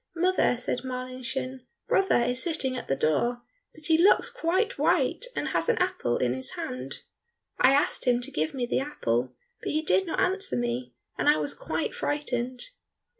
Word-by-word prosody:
"Mother," 360 -7 +2
said 250 +1 -1
Marlinchen, 255 0 -4 0.2
"brother 385 -9 +3
is 250 +1 0
sitting 275 -6 0
at 250 - -5
the 135 - +1
door, 240 - +1 0.3
and 310 - -7
he 320 -1 +4
looks 415 +6 +5
quite 385 -2 0
white - - +2
and - - -1
has - - +1
an 475 - +3
apple 360 - 0
in 125 -1 +1
his 130 0 -3
hand. 130 +2 -5 0.6
I - - +6
asked 285 0 +2
him 245 -1 +3
to 265 +3 -4
give 155 - -1
me 250 -2 -1
the - - 0
apple, 130 - -1 0.3
but - - -3
he 310 +1 0
did 385 +4 +2
not 320 - -2
answer 380 - +1
me, 120 +1 -2 0.2
and - - +3
I 300 - +5
was - - -1
quite - - -3
frightened." 255 - -2
255 Hz, 180 wpm, -27 LUFS, 235-325 Hz, 0.6 s, I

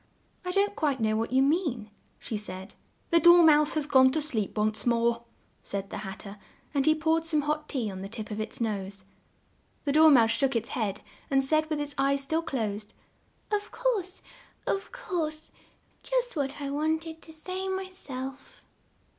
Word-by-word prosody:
"I 360 - -4
don't 400 +2 +2
quite 285 -4 0
know 215 -1 +1
what 225 +2 -1
you 265 +1 +4
mean," 275 - 0 0.3
she 225 - -5
said. 190 -2 -6 0.4
"The 335 - +6
Dor 345 +1 +8
mouse 300 -1 +5
has 305 -2 0
gone 260 -3 +6
to 315 - +2
sleep, 235 -10 -1
once 215 +1 0
more," 235 0 +2 0.4
said 195 0 -5
the - - -4
Hat 190 -2 -7
ter, 200 0 -10 0.3
and 280 0 +1
he 310 - +6
poured 320 +1 +1
some 320 -2 +1
hot 300 +1 -2
tea 250 -6 -1
on 190 0 -7
the 195 - -6
tip 215 0 -7
of 210 - -4
its 215 - -5
nose. 200 -4 -3 0.8
The 285 - +1
Dor 315 +2 +7
mouse 235 -6 +6
shook 270 0 +1
its 230 0 -1
head, 210 -6 -2 0.3
and 270 -1 +3
said 310 +3 +1
with 305 -2 -1
its 290 0 -3
eyes 275 0 +2
still 315 +4 0
closed, 215 -8 -4 0.6
"Of 420 0 -1
course, 425 -7 -2 0.4
of 390 0 -2
course; 335 -11 -4 0.5
just - - -1
what 280 -2 -2
I 280 -1 -3
want 315 +3 0
ed 320 0 -8
to 320 - -12
say 370 +4 -5
my 380 0 -3
self." 270 -7 -8
285 Hz, 190 wpm, -28 LUFS, 225-320 Hz, 0.8 s, Dor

